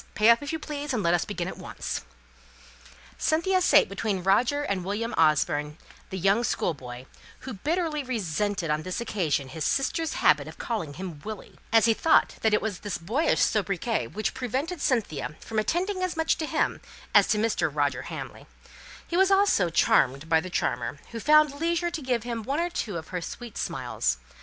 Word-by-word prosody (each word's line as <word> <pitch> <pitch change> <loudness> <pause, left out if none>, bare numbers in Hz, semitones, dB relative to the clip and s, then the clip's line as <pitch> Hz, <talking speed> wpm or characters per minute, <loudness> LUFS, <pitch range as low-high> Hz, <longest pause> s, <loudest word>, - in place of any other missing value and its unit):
Pay 215 +2 +5
up, 235 - +3
if 285 - -4
you 320 - -1
please, 295 -3 -4
and 215 - -1
let 170 - +3
us 175 - +1
begin 180 -4 -4
at - - -7
once." - - -5 1.2
Cynthia 370 +4 +2
sate - - +5
between 195 -1 -2
Roger 245 +10 +2
and 200 -9 -2
William 210 +5 -2
Orford, 150 -1 +2 0.3
the 190 - -4
young 195 +6 +2
schoolboy, 130 - -3 0.4
who 260 - -6
bitterly 310 - -1
resented 205 - -2
on 150 +1 0
this 185 +6 -4
occasion 165 - -1
his 155 +3 -5
sisters' 320 - 0
habit - - +3
of - - -10
calling 170 -12 -3
him 175 -6 -7
"Willie," 215 -1 -8
as 225 -1 +5
he 230 - +5
thought 320 +8 +3
it 215 -1 +3
was 210 -5 -3
this 205 -3 -4
boyish 225 - +1
sobriquet 210 +2 0
which 215 -1 -3
prevented 270 - -3
Cynthia 200 - -1
from 220 -1 -3
attending 370 - -1
as 370 -2 -2
much 320 0 +2
to 315 - -2
him - - 0 0.3
as - - +6
to 215 - +2
Mr. 210 -7 +1
Roger 140 -3 0
Hamley; - - -8 0.6
he 340 - -3
also 385 +1 +5 0.3
was 170 - -4
charmed 135 +4 +3
by 160 0 +4
the 185 +3 -6
charmer, - - -1
who 230 - -5
found 305 +3 +5
leisure 340 +1 +1
to 330 - -4
give 250 -4 -1
him 235 -1 -3
one 275 +8 -2
or 345 +1 -1
two 210 - -3
of 160 - -8
her 180 -1 -3
sweet 235 +5 -8
smiles. - - -1
215 Hz, 185 wpm, -27 LUFS, 175-290 Hz, 1.2 s, as